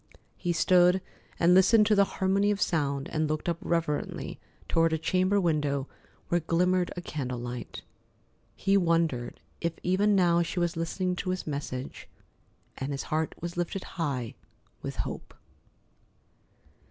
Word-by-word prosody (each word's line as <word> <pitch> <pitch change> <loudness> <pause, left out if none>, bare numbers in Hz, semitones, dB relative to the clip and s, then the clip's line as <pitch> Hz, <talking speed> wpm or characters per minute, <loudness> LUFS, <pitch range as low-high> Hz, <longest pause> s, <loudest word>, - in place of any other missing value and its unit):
He 175 - -2
stood 180 +2 +4 0.4
and 175 +1 +5
listened 200 +4 +6
to 215 - +3
the 200 -1 +5
harmony 195 +2 +2
of 205 -1 0
sound 140 -7 0
and 155 -1 0
looked 155 +2 -2
up 170 -1 0
reverently 165 -5 -2 0.3
toward 165 0 +2
a - - +2
chamber 185 +5 +2
window 145 -6 0 0.4
where 175 - +3
glimmered 180 +2 +1
a - - -3
candle 130 -6 -4
light. 120 0 -6 0.7
He 195 +1 +2
wondered 165 -9 +1 0.2
if 170 -1 -1
even 200 +3 +3
now 175 -2 +4
she 170 +1 -2
was 175 -1 0
listening 180 +2 -1
to 185 - -3
his 185 0 -2
message, 140 -3 -5 0.7
and 135 +2 -3
his 140 - -3
heart 160 0 0
was 170 +1 -5
lifted 175 +2 -2
high 140 -9 -3 0.5
with - - -5
hope. - - -7
170 Hz, 145 wpm, -28 LUFS, 150-185 Hz, 0.7 s, listened